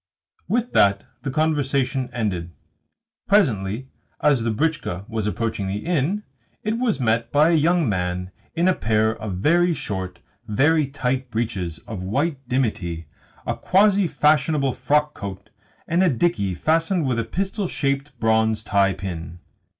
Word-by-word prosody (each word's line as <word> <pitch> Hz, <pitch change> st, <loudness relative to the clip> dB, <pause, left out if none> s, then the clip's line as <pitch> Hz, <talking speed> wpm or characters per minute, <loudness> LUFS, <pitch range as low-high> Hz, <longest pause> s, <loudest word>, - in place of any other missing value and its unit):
With 240 Hz, +1 st, 0 dB
that 100 Hz, 0 st, +4 dB, 0.2 s
the 140 Hz, -, -3 dB
conversation 135 Hz, -3 st, 0 dB
ended. 90 Hz, -8 st, -3 dB, 0.7 s
Presently, 130 Hz, -, +1 dB, 0.3 s
as 145 Hz, -5 st, +3 dB
the 115 Hz, -, 0 dB
britchka 115 Hz, -, -1 dB
was 110 Hz, -2 st, -2 dB
approaching 110 Hz, -2 st, -2 dB
the 100 Hz, +6 st, -4 dB
inn, 175 Hz, +5 st, 0 dB, 0.4 s
it 220 Hz, +2 st, -1 dB
was 230 Hz, -, +1 dB
met 115 Hz, -1 st, +1 dB
by 150 Hz, +3 st, +4 dB
a -, -, +3 dB
young 165 Hz, 0 st, +3 dB
man 90 Hz, -2 st, -2 dB, 0.2 s
in 170 Hz, +2 st, +2 dB
a 185 Hz, -, +5 dB
pair 110 Hz, -5 st, +1 dB
of 105 Hz, -4 st, -5 dB
very 170 Hz, -, +3 dB
short, 95 Hz, -, -4 dB, 0.3 s
very 145 Hz, +7 st, +3 dB
tight 130 Hz, -2 st, -2 dB
breeches 105 Hz, -8 st, -2 dB
of 105 Hz, -4 st, -6 dB
white 140 Hz, -, -1 dB
dimity, 95 Hz, -10 st, -1 dB, 0.4 s
a -, -, -1 dB
quasi 200 Hz, 0 st, +3 dB
fashionable 150 Hz, -3 st, +2 dB
frockcoat, 130 Hz, -8 st, -1 dB, 0.4 s
and 170 Hz, +2 st, +2 dB
a 185 Hz, -, +4 dB
dickey 120 Hz, -, 0 dB
fastened 165 Hz, -, +1 dB
with 125 Hz, -3 st, 0 dB
a -, -, 0 dB
pistol 195 Hz, -, -2 dB
shaped 140 Hz, -4 st, -2 dB
bronze 110 Hz, -1 st, +2 dB
tie 100 Hz, -2 st, +2 dB
pin. 90 Hz, -2 st, -6 dB
130 Hz, 140 wpm, -23 LUFS, 105-160 Hz, 0.7 s, a